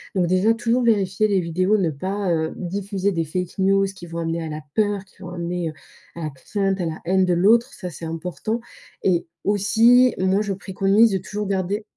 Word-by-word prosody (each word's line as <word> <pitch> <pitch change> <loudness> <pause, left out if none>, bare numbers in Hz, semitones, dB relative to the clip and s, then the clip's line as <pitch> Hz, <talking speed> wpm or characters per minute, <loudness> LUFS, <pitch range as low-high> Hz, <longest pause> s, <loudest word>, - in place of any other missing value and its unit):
Donc, 180 -2 +2
déjà, 185 +5 +3
toujours 235 +2 0
vérifier 210 -2 +2
les 195 -3 +2
vidéos, 185 +5 +1
ne 185 -5 +1
pas, 190 +6 -2
heu, 160 -1 0
diffuser 195 +2 -2
des 165 -3 -1
fake 180 +3 -4
news, 195 +1 +3
qui 185 -3 -11
vont 165 0 -5
amener 165 0 -2
à 160 - -4
la 155 0 -5
peur 205 -2 +1
qui 190 -1 -24
vont 180 -1 -7
amener, 175 0 -3
heu, - - -8 0.4
à 170 - -7
la 155 - -2
crainte, 195 +8 -2
à 180 - -1
la 160 -1 -4
haine 190 +2 +2
de 180 - +2
l'autre. 225 +8 +3
Ça, 180 - -6
c'est 165 0 -8
important. 180 +8 -4 0.4
Et 175 -3 +1 0.2
aussi, 225 +5 +4
moi, 190 +2 +2
je 205 -2 -2
préconise 195 +3 +2
de 195 - +1
toujours 210 +3 -5
garder 195 +2 -1
190 Hz, 210 wpm, -22 LUFS, 175-205 Hz, 0.4 s, aussi